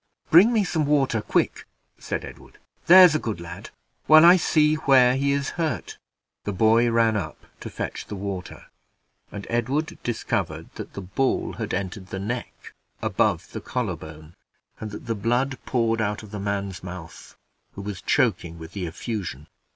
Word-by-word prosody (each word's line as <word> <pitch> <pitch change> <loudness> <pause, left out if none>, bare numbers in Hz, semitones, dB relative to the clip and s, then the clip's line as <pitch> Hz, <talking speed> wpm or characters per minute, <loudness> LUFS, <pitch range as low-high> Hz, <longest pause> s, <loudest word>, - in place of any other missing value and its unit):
"Bring 185 +9 +8
me 220 -3 +2
some 160 -5 -1
water, 135 -6 +2
quick," - - -1 0.3
said - - -4
Edward, - - -13 0.3
"there's 180 -2 +9
a 155 - +1
good 110 -9 -4
lad, 85 0 -9 0.4
while 155 +1 +8
I 175 +2 +9
see 155 -3 +3
where 130 -5 +4
he 140 +1 +1
is 140 -1 -1
hurt." 160 -2 -3 0.4
The 105 - -3
boy 115 +4 +3
ran 115 -1 +3
up 105 - -5
to - - -7
fetch - - -5
the 105 - -6
water, 95 -2 -6 0.7
and 100 -1 -7
Edward 130 +7 -1
discovered 120 -2 -3
that - - -8
the 100 - -6
ball 130 +9 -1
had - - -5
entered 95 0 -4
the 95 - -6
neck 120 +5 -6 0.3
above - - 0
the - - -6
collar - - -2
bone, 80 +1 -12 0.5
and 110 - -5
that 105 - -9
the 115 - -1
blood 120 +5 -1
poured 115 -2 +1
out 105 0 -2
of 105 - -12
the 105 - -5
man's 100 -2 -3
mouth, 90 -2 -10 0.4
who 100 - -8
was 100 -2 -6
choking 85 -1 0
with 80 0 -10
the 90 -2 -4
effusion. 85 - -5
110 Hz, 170 wpm, -24 LUFS, 95-135 Hz, 0.7 s, there's